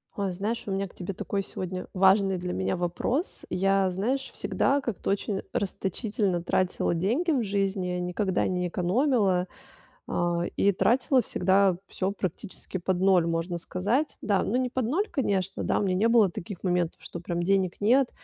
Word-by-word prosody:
Ой, 200 -2 -1
знаешь, 210 +6 -3
у - - -2
меня 195 +1 -1
к - - -19
тебе 185 +1 -5
такой 200 +2 -2
сегодня 185 -1 -5
важный 190 0 +4
для 180 0 -4
меня 95 +1 -1
вопрос. 180 - -2
Я, 195 0 +2
знаешь, 235 +9 -1
всегда 280 +1 +1
как-то 235 -7 -4
очень 200 0 -1
расточительно 200 -1 -1
тратила 180 0 0
деньги 235 - +1
в 270 -5 +2
жизни, 195 -2 -1
никогда 180 +2 0
не 180 -1 -1
экономила, 190 - +1 0.6
а, 175 0 0
и 200 - +4
тратила 255 - +3
всегда 190 -3 +2
всё 190 +1 -2
практически 190 0 -5
под 180 0 -1
ноль, 185 -3 +4
можно 165 +1 -1
сказать. 205 - -1
Да, 200 -2 +1
ну, 215 - -2
не 255 0 +1
под 260 0 -1
ноль, 335 - 0
конечно, 195 - -1
да, - - +1
у - - 0
меня 185 -2 +1
не 210 +4 +2
было 225 -5 +5
таких 175 +1 -7
моментов, 175 -2 0
что - - -7
прям 170 0 -3
денег 190 0 +1
нет. 245 +5 +4
195 Hz, 170 wpm, -27 LUFS, 180-215 Hz, 0.6 s, было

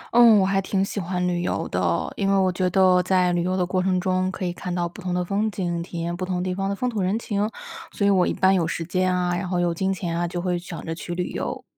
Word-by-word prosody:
嗯， 235 -3 +8
我 190 - +3
还 195 0 +1
挺 195 0 0
喜 200 - -4
欢 180 0 -1
旅 175 -1 0
游 - - -2
的， - - 0
因 195 -1 0
为 195 - +3
我 185 -1 +3
觉 180 0 0
得 185 0 +4
在 180 -1 +2
旅 175 - +1
游 185 +2 0
的 180 - +1
过 185 +1 0
程 185 0 +1
中 185 0 0
可 190 - -4
以 175 - -2
看 180 0 -5
到 175 -1 0
不 170 - -11
同 180 - -3
的 180 0 0
风 205 +3 0
景， 175 -4 -2
体 170 0 -6
验 170 +1 -2
不 185 - -5
同 180 -1 -2
地 185 - -1
方 195 +1 -2
的 200 - -1
风 250 - -2
土 225 -5 -2
人 190 +4 +1
情。 210 -2 -1 0.4
所 200 - -1
以 200 - +5
我 185 -2 +3
一 - - +1
般 190 0 +3
有 170 -4 +2
时 165 0 -3
间 185 +1 +1
啊， 180 -1 0
然 185 0 -3
后 180 - 0
有 175 -1 +1
金 190 +3 -1
钱 175 -3 -3
啊， 175 0 0
就 175 +1 -4
会 175 0 -1
想 175 -1 -8
着 165 - -3
去 175 +1 -6
旅 180 0 -2
游。 - - -4
185 Hz, 320 characters per minute, -24 LUFS, 175-195 Hz, 0.4 s, 嗯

